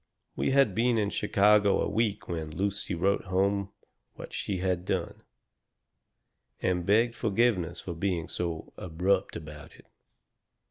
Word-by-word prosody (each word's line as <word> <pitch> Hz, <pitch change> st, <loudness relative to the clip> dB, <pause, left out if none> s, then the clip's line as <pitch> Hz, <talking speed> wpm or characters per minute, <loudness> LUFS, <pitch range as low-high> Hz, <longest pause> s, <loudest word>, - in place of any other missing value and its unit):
"We -, -, 0 dB
had 135 Hz, -6 st, +4 dB
been 115 Hz, +3 st, +2 dB
in 105 Hz, -2 st, 0 dB
Chicago 105 Hz, 0 st, +3 dB
a -, -, +1 dB
week 110 Hz, -2 st, -1 dB
when 80 Hz, -3 st, -4 dB
Lucy 100 Hz, +3 st, -2 dB
wrote 100 Hz, +5 st, +1 dB
home 100 Hz, +1 st, 0 dB, 0.4 s
what -, -, -10 dB
she 100 Hz, -, -2 dB
had 90 Hz, -1 st, -1 dB
done, -, -, -3 dB, 1.4 s
and 90 Hz, -1 st, -1 dB
begged 115 Hz, +4 st, +4 dB
forgiveness 100 Hz, -6 st, +1 dB
for 85 Hz, -, -6 dB
being 85 Hz, -1 st, -2 dB
so 85 Hz, -2 st, -4 dB
abrupt 90 Hz, +3 st, 0 dB
about 75 Hz, -2 st, -9 dB
it. -, -, -18 dB
95 Hz, 135 wpm, -28 LUFS, 90-105 Hz, 1.4 s, had